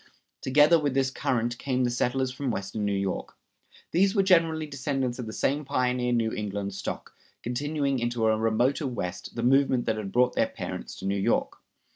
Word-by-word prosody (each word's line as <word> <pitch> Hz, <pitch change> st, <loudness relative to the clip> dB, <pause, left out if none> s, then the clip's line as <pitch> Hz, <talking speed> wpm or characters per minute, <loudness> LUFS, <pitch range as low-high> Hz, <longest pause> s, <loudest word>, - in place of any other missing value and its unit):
Together 150 Hz, +5 st, +5 dB
with 145 Hz, -3 st, -1 dB
this 135 Hz, -1 st, +2 dB
current 120 Hz, -2 st, -1 dB
came 130 Hz, -2 st, 0 dB
the 120 Hz, -, +1 dB
settlers 125 Hz, +2 st, 0 dB
from 130 Hz, +1 st, -3 dB
western 100 Hz, -1 st, -3 dB
New 100 Hz, -, 0 dB
York. 95 Hz, -1 st, -3 dB, 0.5 s
These 195 Hz, +4 st, +3 dB
were 195 Hz, -, +4 dB
generally 165 Hz, -4 st, +3 dB
descendants 135 Hz, -3 st, -2 dB
of 120 Hz, -, -4 dB
this 110 Hz, -, -6 dB
same 145 Hz, +3 st, +1 dB
pioneer 125 Hz, -3 st, 0 dB
New 115 Hz, -2 st, +1 dB
England 100 Hz, -1 st, -3 dB
stock, 95 Hz, -, -6 dB, 0.3 s
continuing 140 Hz, +2 st, -1 dB
into 120 Hz, -1 st, -1 dB
a 110 Hz, 0 st, +4 dB
remoter 120 Hz, +7 st, +1 dB
West 90 Hz, -7 st, -5 dB
the 115 Hz, -, -3 dB
movement 130 Hz, -1 st, +3 dB
that 110 Hz, -1 st, 0 dB
had 100 Hz, -3 st, -5 dB
brought 125 Hz, +3 st, +3 dB
their -, -, +2 dB
parents -, -, -6 dB
to 95 Hz, -, -8 dB
New 100 Hz, +1 st, 0 dB
York. 95 Hz, -, 0 dB
125 Hz, 185 wpm, -27 LUFS, 110-140 Hz, 0.5 s, Together